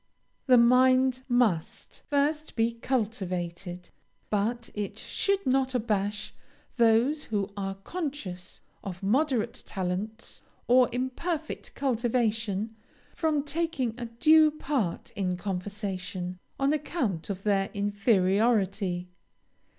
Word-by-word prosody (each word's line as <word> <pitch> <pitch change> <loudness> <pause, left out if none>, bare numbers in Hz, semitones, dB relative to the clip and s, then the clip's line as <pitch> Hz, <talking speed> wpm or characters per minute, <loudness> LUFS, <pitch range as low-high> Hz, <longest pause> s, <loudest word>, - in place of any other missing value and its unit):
The 255 -1 +7
mind 255 +2 +5
must 230 -10 0
first 295 +2 0
be 230 0 +2
cultivated; 185 -7 -3 0.4
but 225 +3 -1
it 205 -1 -4
should 395 0 0
not 260 0 +2
abash 210 -3 -1 0.4
those 235 +6 +3
who 200 -2 -2
are 195 -1 -3
conscious 200 - -6 0.2
of 190 -2 -7
moderate 245 +1 +1
talents, 195 +4 -4 0.3
or 250 0 +6
imperfect 290 +6 -3
cultivation, 225 -4 0 0.4
from 310 -3 +1
taking 295 -5 -1
a 240 - -3
due 310 +7 +5
part 275 - -2
in 185 -2 -2
conversation, 185 -1 -4 0.2
on 275 +2 +3
account 260 - -2
of 195 -1 -4
their 195 -2 +2
inferiority. 200 -2 +2
225 Hz, 100 wpm, -28 LUFS, 195-260 Hz, 0.4 s, The